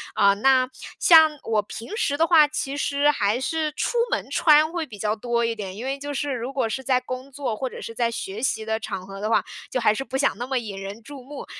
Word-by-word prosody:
呃， 200 0 +5
那 255 +4 +3 0.3
像 320 -2 +7
我 220 -2 +1
平 230 - -8
时 285 -10 0
的 330 - +4
话， 325 -3 +6
其 290 -2 -3
实 285 +1 +2
还 210 -2 0
是 310 +2 -1
出 475 +9 -1
门 - - -2
穿 310 0 +5
会 330 -4 -2
比 215 - -10
较 210 +2 -1
多 235 +1 -1
一 230 - 0
点， 195 -2 -6
因 240 - -6
为 275 +1 -3
就 290 +1 -5
是 285 -1 -2
如 245 +2 -4
果 270 -4 0
是 265 +4 -4
在 255 -1 +2
工 255 +2 -7
作 260 -5 -3
或 260 +3 -3
者 - - -9
是 230 - -7
在 235 0 0
学 215 -2 -5
习 230 -4 -1
的 220 0 -1
场 195 -4 -5
合 195 +1 -9
的 215 - -1
话， 225 - +2 0.2
就 255 - -1
还 220 -3 +3
是 270 - -3
不 265 0 -4
想 275 - +1
那 245 - -4
么 265 0 0
引 205 -5 -5
人 200 +3 -8
注 280 -1 -10
目。 280 +2 -8
255 Hz, 275 characters per minute, -24 LUFS, 220-285 Hz, 0.3 s, 像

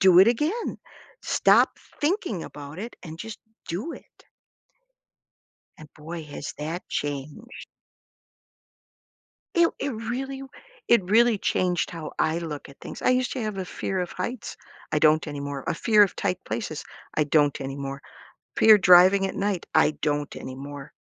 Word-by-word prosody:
Do 185 -2 +7
it 200 - +7
again. 310 - -1 0.4
Stop - - +4 0.2
thinking 300 - 0
about 145 +3 -9
it 230 +4 -7
and 160 -1 -8
just 220 +3 -7 0.3
do 210 - -3
it.'" - - -15 1.6
And, 155 - -11
boy, 160 +2 -7
has 145 -1 -7
that 160 +4 -5
changed 145 +2 -3 2.2
It 340 -1 +5
it 280 - -1
really 260 +5 -4 0.5
it 235 -6 +5
really 230 +1 +5
changed 180 -2 0
how 165 -3 -6
I 160 +1 +2
look 155 -4 -6
at 140 - -16
things. - - -8
I - - +3
used 255 0 +1
to 260 - -3
have 215 -2 -3
a 190 - -2
fear 185 +1 -3
of 180 - -4
heights. 235 +6 -5 0.3
I 155 - +2
don't 155 +1 +4
anymore. 140 -2 -5
A - - +1
fear 210 +4 +5
of 195 - -2
tight 180 - -1
places. 185 -10 -4 0.3
I 155 - +2
don't 145 -1 +2
anymore. 135 0 -5 0.5
Fear 215 -1 +7
driving 185 +1 +7
at - - -6
night. 200 -3 -1
I - - +5
don't 145 -1 -1
anymore. 140 +1 -8
180 Hz, 150 wpm, -25 LUFS, 150-220 Hz, 2.2 s, Do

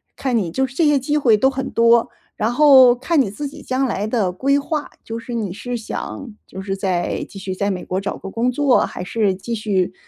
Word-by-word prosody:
看 260 -3 -2
你 190 -7 0
就 265 +10 0
是 260 - -10
这 310 +2 +2
些 295 -1 +4
机 290 +3 -2
会 240 -8 +4
都 265 - +3
很 265 0 -4
多， 230 +1 +3 0.3
然 220 +3 0
后 260 -3 +7
看 280 +4 +1
你 205 - -1
自 285 +8 -5
己 280 - -11
将 260 +1 -1
来 215 -4 -2
的 215 -6 0
规 275 +9 +1
划， 295 +1 -3
就 225 +1 -6
是 235 +1 -7
你 205 -6 -3
是 245 +4 -5
想 230 +2 -6
就 190 - -9
是 195 0 -3
再 185 -3 -2
继 195 - -11
续 190 -1 -5
在 200 +2 -1
美 185 -2 -4
国 185 +2 -2
找 195 - -4
个 195 - -8
工 240 +2 0
作 275 0 +3
还 180 - -7
是 200 0 0
继 230 +5 -6
续 195 -4 -1
230 Hz, 255 characters per minute, -20 LUFS, 195-265 Hz, 0.3 s, 后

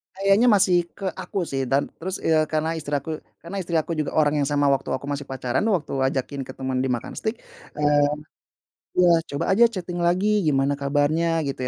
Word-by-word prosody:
Kayaknya 195 +5 +3
masih 185 -2 +4 0.2
ke 195 - -7
aku, 195 - -4
sih, 135 -5 -3
dan 135 +2 0
terus, 185 +3 -3
eee, 155 -1 +3
karena 155 +1 -1
istri 145 -1 -3
aku 155 +3 -3 0.2
karena 175 +4 -6
istri 170 -2 -3
aku 160 +1 0
juga 150 - -2
orang 150 -1 +3
yang 140 - +1
sama 145 -1 +2
waktu 135 - 0
aku 130 - -7
masih 145 0 -4
pacaran, 130 -1 -2
waktu 185 -8 0 0.2
ajakin 135 +1 -3
ketemuan 130 -1 -3
di 130 - 0
makan 120 -2 -3
steak, 220 +1 -2 0.4
eee, 145 -1 +3 0.9
iya, 180 -1 +6 0.2
"Coba 140 - -3
aja 235 +4 +6
chatting 180 -5 -5
lagi, 190 +5 +2
gimana 140 -5 +2
kabarnya." 150 +4 +1
Gitu, 140 -2 -4
155 Hz, 190 wpm, -24 LUFS, 140-175 Hz, 0.9 s, iya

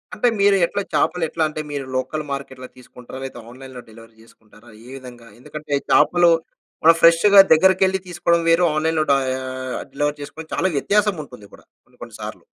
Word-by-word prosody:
అంటే 245 - +1
మీరు 200 0 +4
ఎట్లా, 200 - -4
చేపలు 180 -2 0
ఎట్లాంటే 155 -1 -2
మీరు 140 -2 -5
లోకల్ 130 +4 -3
మార్కెట్‌లో 130 -2 -7
తీసుకుంటరా? 125 0 -13
లేతే 135 -2 -8
ఆన్‌లైన్‌లో 130 0 -12
డెలివరీ 115 0 -17
జేసుకుంటారా? 110 0 -21 0.2
ఏ - - -13
విధంగా, 120 -2 -13
ఎందుకంటే 150 +3 -8 0.2
చేపలూ, 175 +3 +4 0.5
మనం 165 +1 +6
ఫ్రెష్‌గా 170 +5 +6
దగ్గరికెళ్లి 190 +3 +3
తీసుకోడం 170 -1 0
వేరు, 165 +2 +3
ఆన్‌లైన్‌లో 160 0 0
డయా 130 -1 0 0.5
డెలివరీ 145 0 -2
చేసుకోడం 160 +2 -10
చాలా 190 +2 0
వ్యత్యాసం 205 +4 0
ఉంటుంది 105 -7 -15
కూడా - - -17 0.2
కొన్ని - - -30
కొన్ని - - -12
సార్లు. - - -8
150 Hz, 160 wpm, -20 LUFS, 130-170 Hz, 0.5 s, మనం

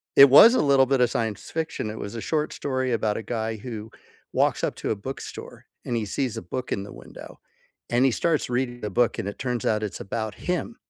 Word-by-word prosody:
it 140 0 +10
was 225 - +9
a - - +3
little 140 -2 +5
bit 135 -1 +2
of 120 - +4
science 110 -3 -3
fiction, 160 -9 -3
it 110 - -6
was 100 +3 -6
a - - -4
short 155 -1 -1
story 130 -2 -2
about 110 -2 0
a 110 - -5
guy 110 0 -3
who 110 -1 -7 0.4
walks - - +1
up - - 0
to - - -4
a - - +1
bookstore, 130 +7 -8 0.2
and 120 - -2
he 110 -2 -1
sees 125 +4 -2
a - - -4
book 125 +8 -5
in 100 - -1
the 100 - -10
window, - - -12 0.5
and 120 +2 +3
he 130 - +4
starts 155 +2 0
reading 120 0 -2
the 105 - -3
book, 120 +4 +1
and 100 - -3
it - - -9
turns 125 -3 -2
out 110 0 +1
it's 105 - -4
about 110 +1 -4
him. 180 +6 -3
120 Hz, 235 wpm, -25 LUFS, 110-135 Hz, 0.5 s, it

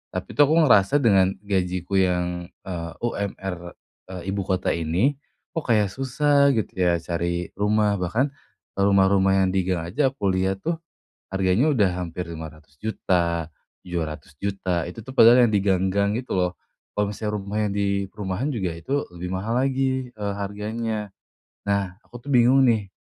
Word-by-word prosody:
tapi, - - -4
tuh, 145 -1 +5
aku 160 +2 +4
ngerasa 105 -3 +5
dengan 95 -3 +4
gajiku 95 -1 0
yang, 90 -1 0 0.2
eee, 85 -3 -5
UMR 95 -5 -4 0.3
eee, 95 0 -8
ibu 100 - -1
kota 95 -1 -1
ini, 85 - +1 0.4
kok, 165 - -1
kayak 105 -3 +4
susah, 140 +5 +2
gitu, 110 -5 -2
ya, 90 -2 +2
cari 85 +1 -2
rumah. 105 +1 +2
Bahkan, 100 +9 0 0.5
eee, 100 - +1
rumah-rumah 95 -1 +4
yang 95 - +3
di 95 0 +1
gang 90 -1 0
aja 135 - +1
aku 120 -7 -3
lihat, 95 +1 +1
tuh, 165 +9 -1 0.5
harganya 95 +7 +2
udah 115 -11 +3
hampir 90 0 -4
Rp500.000.000, 80 +1 -2 0.3
Rp700.000.000, 85 +2 -3
itu, 110 +6 -8
tuh, 130 - -9
padahal 120 -1 +7
yang 110 - 0
di 105 - +3
gang-gang 100 +1 +1
itu, 125 +1 -5
loh. 90 -1 0 0.4
Kalau 105 0 0
misalnya 105 +1 -4
rumah 100 +1 -4
yang 100 - -3
di 100 -1 0
perumahan 100 +5 -3
juga 95 -6 -1
itu 130 +13 -2
lebih 90 +1 -6
mahal 110 +6 -1
lagi, 130 -1 0
eee, 100 -2 -3
harganya. 105 +1 -3 0.6
Nah, 100 -2 0
aku, 120 +2 -13
tuh, - - -7
bingung, 130 +2 +5
nih, 110 -5 +2
100 Hz, 160 wpm, -24 LUFS, 90-115 Hz, 0.6 s, padahal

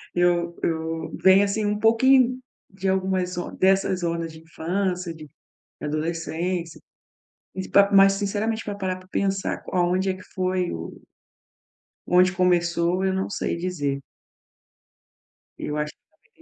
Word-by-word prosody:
eu 175 -1 +1
eu 160 0 -2
vem 190 +1 +6
assim 210 +2 -1
um 205 0 0
pouquinho 255 +3 +4 0.3
de 195 0 -5
algumas 190 -1 0
zo 175 - -4
dessas 190 -1 +2
zonas 170 -1 -2
de 160 - -12
infância, 180 +2 -2
de 155 -2 -12 0.5
adolescência. 165 +2 -3 0.7
E 190 0 -5
pa 200 0 +5
mas 195 0 +7
sinceramente, 210 +3 -2
pra 205 - -4
parar 190 -2 -2
pra 185 0 -18
pensar 195 0 -1
q - - -10
aonde 185 +2 +2
é - - -1
que 185 - -12
foi 185 -1 0
o 80 0 -7 1.1
onde 180 +1 +5
começou, 175 0 +1
eu 190 - +1
não 190 0 -2
sei 200 - -2
dizer. 145 -6 -2 1.6
Eu 150 - -4
acho 150 0 -2 0.4
que - - -25
185 Hz, 140 wpm, -24 LUFS, 170-195 Hz, 1.6 s, mas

